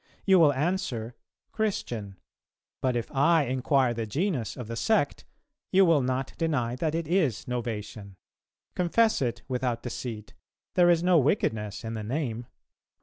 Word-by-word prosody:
You 190 -2 +6
will 155 -3 +6
answer, 130 -7 -2 0.4
'Christian.' 120 - -3 0.6
But 130 -2 +1
if 120 -1 -3
I 150 +3 +4
inquire 130 0 +1
the 115 -1 -4
genus 140 - -2
of 125 -4 -6
the 115 - -5
sect, 200 - 0 0.5
you 195 0 +6
will 165 -5 +4
not 130 +1 -2
deny 130 -8 0
that 155 +3 -1
it 165 -2 -2
is 160 - +1
Novatian.... 110 -5 -5 0.6
Confess 215 +4 +2
it 120 -3 -2
without 125 -3 -2
deceit; 115 -3 -6 0.4
there 175 -1 +5
is 170 -1 +3
no 180 -2 +5
wickedness 110 - 0
in 115 - -4
the 110 - -4
name. 120 -1 -3
130 Hz, 145 wpm, -27 LUFS, 115-165 Hz, 0.6 s, You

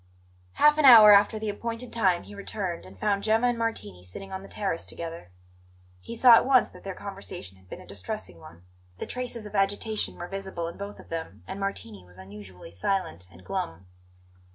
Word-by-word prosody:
Half 300 +1 +5
an 300 - +4
hour 220 -5 +11
after 205 +2 +5
the 215 0 -3
appointed 230 +3 -4
time 185 -6 +2
he - - -12
returned, 195 - -5
and 95 0 -15
found 200 -1 +1
Gemma 220 +3 +2
and 245 -1 +1
Martini 105 - -3
sitting 190 - -9
on 190 0 -5
the 195 - -12
terrace 195 -5 -3
together. 165 - -7 0.7
He 230 - -8
saw 240 +1 +8
at 230 - +7
once 260 -2 +5
that - - -15
their 195 -1 -6
conversation 195 - -8
had 95 -1 -23
been - - -8
a - - -13
distressing 90 -2 -7
one; 85 +2 -14 0.3
the - - -5
traces 245 -3 -4
of 210 - -10
agitation 205 +2 0
were 175 - -7
visible 190 -3 -5
in 170 - -7
both 200 +1 -8
of - - -14
them, 165 -1 -6
and 190 +1 -6
Martini 115 - -5
was 90 0 -18
unusually 95 -2 -11
silent 90 - -2
and 90 0 -17
glum. 80 +1 -4
195 Hz, 200 wpm, -27 LUFS, -, 0.7 s, hour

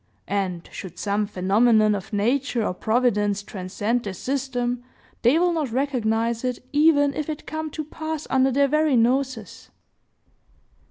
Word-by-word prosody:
And, 185 -4 -2
should 185 -4 -8
some 205 0 -1
phenomenon 215 +3 +3
of 195 -1 -5
nature 235 +2 0
or - - -1
providence 210 -2 +1
transcend 205 +5 -2
their 200 - -4
system, 245 +1 -2 0.4
they 245 +7 +4
will 350 +1 +2
not 305 -7 -2
recognize 235 -3 0
it, 250 -1 -1 0.2
even 290 -1 +4
if 305 +1 -4
it 305 -1 -5
come 315 0 -4
to 310 +1 -5
pass 315 0 -5
under 265 0 +4
their 280 +2 +3
very 305 0 +2
noses. 245 -1 0
245 Hz, 145 wpm, -24 LUFS, 210-280 Hz, 0.4 s, they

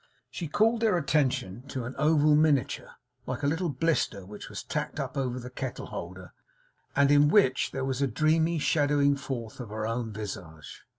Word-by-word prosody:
She 165 +6 -4
called 225 +8 +2
their 215 -5 +3
attention 135 - 0
to 130 -2 -4
an 130 - -5
oval 150 0 +4
miniature, 150 -3 +2 0.4
like 130 +2 -4
a - - +2
little 165 +4 0
blister, 135 - 0
which 105 +2 -9
was - - -6
tacked - - -3
up - - -4
over 125 -2 -1
the 125 +1 -8
kettle 130 0 -5
holder, - - -8 0.6
and 140 0 +4
in 145 0 +6
which 150 -7 +3
there 135 -1 -3
was 135 0 -2
a 140 - +3
dreamy 160 +6 +2
shadowing 145 -2 +2
forth 125 -5 -6
of 120 -4 -6
her 110 +1 -3
own 115 0 -2
visage. 95 -7 -8
140 Hz, 180 wpm, -28 LUFS, 120-155 Hz, 0.6 s, in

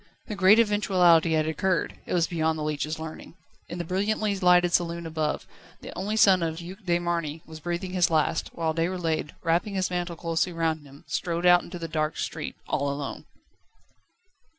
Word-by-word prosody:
The 215 - -5
great 195 +2 +6
eventuality 185 -7 +4
had 155 -1 +2
occurred: 180 +3 -1
it - - -3
was 170 -2 +3
beyond 160 -2 0
the 155 - -3
leech's 150 +1 -2
learning. 160 +1 -8 0.3
In 170 - -5
the 175 - -2
brilliantly 205 +4 0
lighted 180 -1 +4
saloon 170 -1 0
above, 155 -2 -2 0.4
the - - -9
only 200 +4 -2
son 195 -4 +5
of 160 -1 -2
the 170 +1 -7
Duc 195 +4 -11
de 175 -1 +2
Marny 170 -3 -3
was 160 -1 -10
breathing 175 +3 -3
his 180 -2 +3
last, 160 0 +1
whilst 165 -1 -2
Déroulède, 165 -3 -1
wrapping 175 +4 +1
his 185 -1 0
mantle 175 -1 -2
closely 165 +2 -1
round 160 -3 -1
him, 140 +1 -15
strode 170 0 -2
out 175 0 +7
into 175 - -8
the 165 -1 -5
dark 155 -1 -1
street, - - -4
all 140 0 0
alone. 140 0 -5
170 Hz, 185 wpm, -26 LUFS, 160-180 Hz, 0.4 s, out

